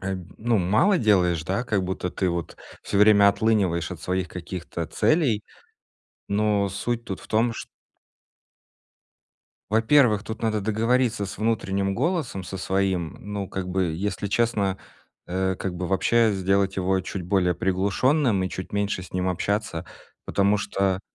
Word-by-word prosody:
э, 95 Hz, 0 st, -2 dB, 0.2 s
ну, 115 Hz, 0 st, +1 dB
мало 110 Hz, -, +3 dB
делаешь, 90 Hz, -, +3 dB
да, 95 Hz, +8 st, -2 dB
как 105 Hz, -5 st, 0 dB
будто 90 Hz, 0 st, -3 dB
ты 95 Hz, 0 st, -1 dB
вот 85 Hz, -2 st, -3 dB, 0.3 s
всё 100 Hz, -, -1 dB
время 105 Hz, -1 st, +7 dB
отлыниваешь 100 Hz, -6 st, +1 dB
от 85 Hz, -3 st, -8 dB
своих 90 Hz, -1 st, -1 dB
каких-то 85 Hz, -1 st, -6 dB
целей, 130 Hz, -, +1 dB, 0.9 s
но 105 Hz, -1 st, +1 dB
суть 115 Hz, +4 st, -3 dB
тут 95 Hz, -, -5 dB
в -, -, -14 dB
том, 115 Hz, +2 st, +2 dB
чт -, -, -7 dB, 2.0 s
Во-первых, 110 Hz, -1 st, +4 dB
тут 110 Hz, +1 st, -7 dB
надо 110 Hz, -2 st, 0 dB
договориться 115 Hz, +1 st, +1 dB
с 95 Hz, -, -7 dB
внутренним 100 Hz, -3 st, 0 dB
голосом 155 Hz, -, -1 dB
со 95 Hz, +2 st, -6 dB
своим. 95 Hz, -3 st, -1 dB
Ну, 100 Hz, -1 st, -4 dB
как 95 Hz, -1 st, -4 dB
бы, 90 Hz, -3 st, 0 dB
если 100 Hz, +3 st, -3 dB
честно, 100 Hz, -3 st, 0 dB, 0.5 s
э, 95 Hz, +1 st, -1 dB
как 95 Hz, -1 st, -4 dB
бы 90 Hz, +1 st, -3 dB
вообще 110 Hz, +4 st, +3 dB
сделать 95 Hz, 0 st, +1 dB
его 95 Hz, 0 st, +1 dB
чуть 95 Hz, +1 st, -5 dB
более 90 Hz, 0 st, +1 dB
приглушенным 100 Hz, -, +1 dB
и 95 Hz, -, -1 dB
чуть 95 Hz, -, -7 dB
меньше 100 Hz, -2 st, -1 dB
с 90 Hz, -, -13 dB
ним 90 Hz, 0 st, 0 dB
общаться, 95 Hz, -1 st, -2 dB, 0.4 s
потому 100 Hz, +1 st, +2 dB
что 95 Hz, -2 st, -1 dB
100 Hz, 150 wpm, -25 LUFS, 95-110 Hz, 2.0 s, время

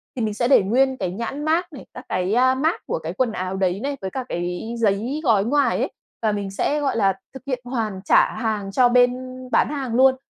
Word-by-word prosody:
thì 250 Hz, -, -3 dB
mình 215 Hz, -2 st, -1 dB
sẽ 235 Hz, +3 st, 0 dB
để 260 Hz, -6 st, +5 dB
nguyên 260 Hz, +6 st, +2 dB
cái 185 Hz, -5 st, -2 dB
nhãn 235 Hz, +9 st, -4 dB
mác 335 Hz, +2 st, 0 dB
này, 275 Hz, -, -10 dB
các -, -, -10 dB
cái, 185 Hz, +2 st, 0 dB
a, 260 Hz, +2 st, +4 dB
mác 310 Hz, +6 st, 0 dB
của -, -, -1 dB
cái 165 Hz, +1 st, -5 dB
quần 245 Hz, +4 st, 0 dB
áo 185 Hz, -2 st, -3 dB
đấy 190 Hz, -1 st, 0 dB
này, 280 Hz, 0 st, -2 dB
với 190 Hz, -, -3 dB
cả 260 Hz, -, -3 dB
cái 180 Hz, +6 st, -3 dB
giấy 230 Hz, +7 st, 0 dB
gói 215 Hz, -7 st, +3 dB
ngoài 285 Hz, +4 st, +2 dB
ấy -, -, -1 dB, 0.3 s
và 220 Hz, -2 st, +2 dB
mình 200 Hz, -2 st, -3 dB
sẽ, 285 Hz, +9 st, 0 dB
gọi 275 Hz, -4 st, 0 dB
là, 195 Hz, -3 st, +3 dB, 0.2 s
thực 265 Hz, -, -10 dB
hiện 255 Hz, -2 st, -1 dB
hoàn 225 Hz, -6 st, -3 dB
trả -, -, +4 dB
hàng 215 Hz, -4 st, -2 dB
cho 245 Hz, +4 st, +4 dB
bên 245 Hz, 0 st, +5 dB, 0.4 s
bán -, -, +3 dB
hàng 270 Hz, -5 st, -3 dB
luôn. 260 Hz, +1 st, +5 dB
235 Hz, 240 wpm, -22 LUFS, 195-265 Hz, 0.4 s, để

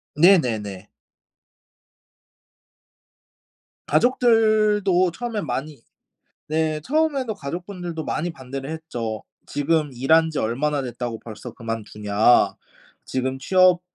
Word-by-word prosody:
네네네. 115 Hz, -, +3 dB, 3.0 s
가족들도 215 Hz, -, +3 dB
처음에는 225 Hz, +2 st, -4 dB
많이 135 Hz, +2 st, -4 dB, 0.7 s
네 155 Hz, 0 st, 0 dB
처음에도 280 Hz, -, 0 dB
가족분들도 175 Hz, 0 st, -6 dB
많이 170 Hz, +3 st, -2 dB
반대를 135 Hz, -2 st, -7 dB
했죠. 120 Hz, -9 st, -5 dB, 0.2 s
"지금 150 Hz, 0 st, 0 dB
일한 160 Hz, +6 st, +3 dB
지 155 Hz, -, -3 dB
얼마나 140 Hz, +6 st, 0 dB
됐다고 120 Hz, -2 st, -5 dB
벌써 115 Hz, +2 st, -9 dB
그만두냐. 110 Hz, -1 st, +1 dB, 0.5 s
지금 130 Hz, 0 st, -2 dB
취업 185 Hz, +3 st, +4 dB
155 Hz, 220 characters per minute, -23 LUFS, 125-185 Hz, 3.0 s, 취업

